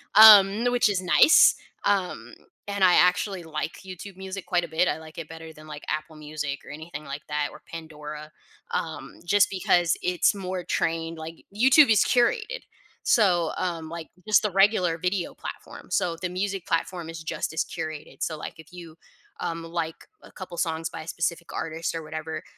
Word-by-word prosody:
um, 210 -2 +11
n 230 +5 -1
which 245 -3 +3
is 195 -3 0
nice. 185 - +6 0.3
Um, 180 - -1 0.3
and 200 -1 -1
I 180 -1 +7
actually 180 +1 +3
like 160 0 -5
YouTube 185 +1 -9
Music 190 0 -7
quite 175 -2 +1
a - - -4
bit. 160 +3 +1
I - - 0
like 160 0 -13
it 165 -2 -6
better 160 0 -10
than, 155 0 -15
like, 150 -1 -9
Apple 155 +1 -3
Music 150 -2 -5
or - - -13
anything 155 0 -8
like 140 +1 -7
that, 150 -1 -1
or - - -13
Pandora, 150 -2 -8 0.4
um, - - -4
just 200 +3 +4
because 175 -2 +2
it's 180 +3 +2
more 185 -2 -4
trained. 165 0 -1
Like, 160 +1 -9
YouTube 265 +6 +6
is 220 - +5
curated, 455 - +1 0.4
so, 175 - +3
um, 165 -3 -3
like 165 -1 -7 0.2
just 215 - +5
the 210 - 0
regular 190 -3 +3
video 180 0 -1
platform. - - -9
So, 170 -2 +1
the 185 - -2
music 190 0 -3
platform 165 0 -2
is 165 0 -7
just 160 - -3
as 160 - -1
curated. 155 -3 -7
So, 155 -2 -2
like, - - -7
if 160 +1 -14
you, 170 -3 -11 0.5
um, 165 0 -3
like 165 -1 -5
a - - -16
couple 185 -3 -9
songs 165 -1 -1
by - - -7
a 155 - -11
specific 170 0 -3
artist 165 +1 -3
or 165 - -4
whatever, 155 0 -6
170 Hz, 185 wpm, -26 LUFS, 160-190 Hz, 0.5 s, um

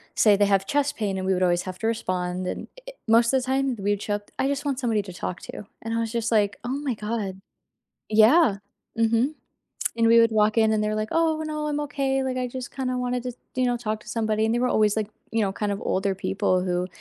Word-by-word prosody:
say 210 -2 +5
they 205 0 +3
have 195 -1 +2
chest 285 +5 0
pain, 200 -3 -1
and 185 - -3
we 190 - +3
would 185 0 +1
always 175 -1 +2
have 185 -1 -6
to 225 - -1
respond, 185 -4 -2
and - - -4 0.2
i - - -6
i - - -20
most 230 +2 +5
the 265 -1 +2
time, 265 0 0
we 205 +1 0
would 205 0 -1
show 205 - -1
up, 205 0 -9
"I 270 - +2
just 280 +1 -2
want 275 -2 -1
somebody 225 -4 +1
to 185 - -9
talk 180 +1 -5
to," - - -8 0.2
and 225 0 -3
I 230 - 0
was 225 -1 -2
just 235 -1 -1
like, 205 -2 +2
"Oh 240 - -4
my 280 -4 -2
god." 210 -3 -4 0.7
Yeah, 220 - +5 0.4
mhm, 230 +6 +2 0.6
and 230 0 +3
we 230 0 +7
would 230 0 +4
walk 215 0 +2
in 220 -1 +4
and 215 -1 +1
they're 210 0 0
like, 215 0 -2
"Oh, 320 -1 +1
no, 305 -1 -3
I'm 295 0 -1
okay," 275 -2 -1
like, 260 -1 -2
"I 250 - -1
just 255 0 -7
kinda 255 -2 -2
wanted 250 0 -2
to, 250 - -3 0.2
you 255 - +2
know, 245 0 +1
talk 215 -2 -3
to - - -15
somebody." 220 -1 0
And 225 - +1
they - - +1
were 250 - +2
always 215 0 +2
like, 215 -1 -1 0.2
you 225 -1 +2
know, 195 -1 0
kind 205 0 -2
of 200 - -4
older 195 0 0
people 190 -1 0
who 180 0 -1
225 Hz, 260 wpm, -25 LUFS, 205-255 Hz, 0.7 s, we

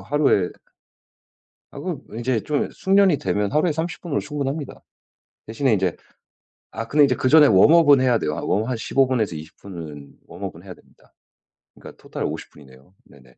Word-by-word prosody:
하루에 105 -5 +1 1.3
아 - - -8
그 - - -5 0.2
이제 120 -2 -1
좀 145 +8 -2
숙련이 195 -4 +2
되면 100 -1 -1
하루에 155 +3 +2
30 160 +3 -4
분으로 160 -5 -2
충분합니다. 145 0 -5 0.7
대신에 115 +3 0
이제 95 -4 0 0.8
아 115 +1 -6
근데 150 +3 +4
이제 135 -2 +2
그 130 - 0
전에 155 0 +7
웜업은 145 - +6
해야 125 -3 +3
돼요. 75 -6 -2
아 - - -4
웜업 110 +4 -1
한 130 - -1
15 135 +4 +1
분에서 110 -10 -1
20 75 +1 -11
분은 80 -7 -10
웜업은 - - -9
해야 - - -9
됩니다. - - -26 0.6
그러니까 - - -13
토탈 - - -5
50 - - -5
분이네요. 65 +3 -18
네네. 65 -3 -20
125 Hz, 325 characters per minute, -22 LUFS, 95-145 Hz, 1.3 s, 전에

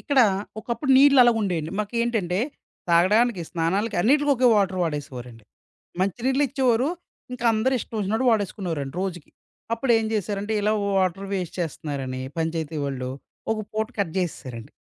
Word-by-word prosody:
ఇక్కడ 285 -3 +3 0.4
ఒకప్పుడు 235 +4 -2
నీళ్ళు 280 0 +7
అలాగా 240 -2 +4
ఉండేయండి. 170 -5 -2
మాకేంటంటే 215 -4 -1 0.5
తాగడానికి, 195 +4 +4
స్నానాలకి 190 +6 0
అన్నిటికి 290 +8 +3
ఒకే 255 0 +2
వాటర్ 195 -3 +1
వాడేసేవారండి. 125 -8 -5 0.6
మంచి 195 +4 -1
నీళ్లు 265 +2 +3
ఇచ్చేవారు. 255 -1 +2 0.4
ఇంకా 245 -1 -6
అందరూ 230 +5 +1
ఇష్టం 225 - -7
వచ్చినట్టు 215 +5 0
వాడేసుకునేవారండి 180 -9 -2
రోజుకి. 175 -5 -5 0.4
అప్పుడేం 230 -2 +2
జేశారంటే 205 0 -2
ఇలా 210 +1 +2 0.2
వాటర్ 190 +1 0
వేస్ట్ 180 -4 -3
చేస్తున్నారని 140 -5 -4 0.2
పంచాయతీ 160 -1 -2
వాళ్ళు 130 -2 -3 0.4
ఒక 220 - -3
పూట 220 0 -1
కట్ 190 -6 0
జేసేసారండి 130 -10 -5
200 Hz, 135 wpm, -24 LUFS, 165-230 Hz, 0.6 s, నీళ్ళు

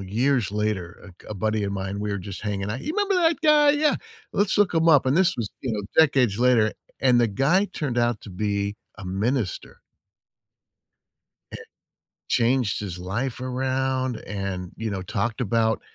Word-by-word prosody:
years 115 +3 0
later. 105 -5 -2
A - - -11
g 90 - -20
a - - -4
buddy 110 +1 -1
of 100 - -2
mine, 95 +1 -4
we 105 0 -2
were 100 - -2
just 100 +2 -8
hanging 100 -1 -3
out, 120 +5 -4
"You 310 - -3
remember 405 -1 +1
that 335 -2 +2
guy?" 300 -1 +6
"Yeah, 295 0 +2 0.4
let's 205 +1 +1
look 205 -3 +3
him 165 +1 +3
up." 145 -5 +6
This 170 +5 +3
was, 115 -4 -3
you 125 -4 -2
know, 105 - -2 0.2
decades 135 -9 +4
later, 120 -3 +3 0.3
and 125 -2 +4
the 120 - +4
guy 145 - +2
turned 130 -10 -3
out 120 -2 +1
to 100 - -10
be 100 +1 -2 0.2
a 100 - -8
minister. 105 - -2 1.7
It - - -9 0.6
changed 120 -2 +1
his 90 -4 -6
life 115 +8 -3
around, 130 -1 -1
and, 95 -3 -4
you 110 0 -4
know, 95 - -3
talked 110 +6 -2
about 110 0 +1
115 Hz, 175 wpm, -24 LUFS, 100-135 Hz, 1.7 s, guy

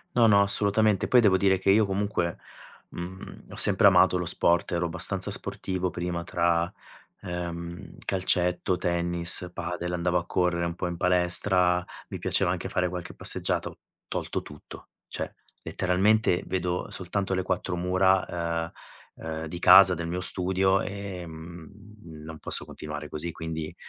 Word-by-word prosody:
No 120 -1 +4
no, 100 -2 +5
assolutamente, 100 0 +1
poi 125 - +4
devo 100 -4 +3
dire 95 -1 +2
che 95 - -1
io 105 +2 +4
comunque, 100 -3 -2 0.5
mhmm, 90 +2 -10
ho - - -9
sempre - - +6
amato 90 - +4
lo 90 - -3
sport, 85 +1 0
ero 85 0 -1
abbastanza 85 - +1
sportivo 95 -1 -3
prima 85 -1 -4
tra, 85 0 0 0.5
ehm, 85 0 -7
calcetto, 90 -1 +1
tennis, 85 0 0
padel, 90 +1 -5
andavo 90 0 0
a 85 - -6
correre, 85 -1 -1
un 85 - -4
po' 90 - -4
in 85 - -5
palestra, 90 0 +4 0.3
mi - - -7
piaceva - - +1
anche - - -4
fare 90 0 -1
qualche 90 -1 -7
passeggiata, - - +2
ho - - -18 0.3
tolto - - -4
tutto, 75 - -13 0.2
cioè - - -6 0.3
letteralmente 95 +1 +1
vedo 90 -1 -3
soltanto 95 +1 -3
le 95 - -1
4 90 0 -3
mura, 90 -2 0
ehm, 85 - -9 0.5
ehm, 80 0 -5
di 85 +2 -7
casa, 95 +1 +7
del 85 0 -5
mio 90 +2 -3
studio, 95 +1 +3
ehm, 85 -5 -8 0.6
non 80 0 -9
posso - - -1
continuare 75 0 -8
così. 85 +2 -2
Quindi, 80 -1 -6
90 Hz, 150 wpm, -26 LUFS, 85-95 Hz, 0.6 s, casa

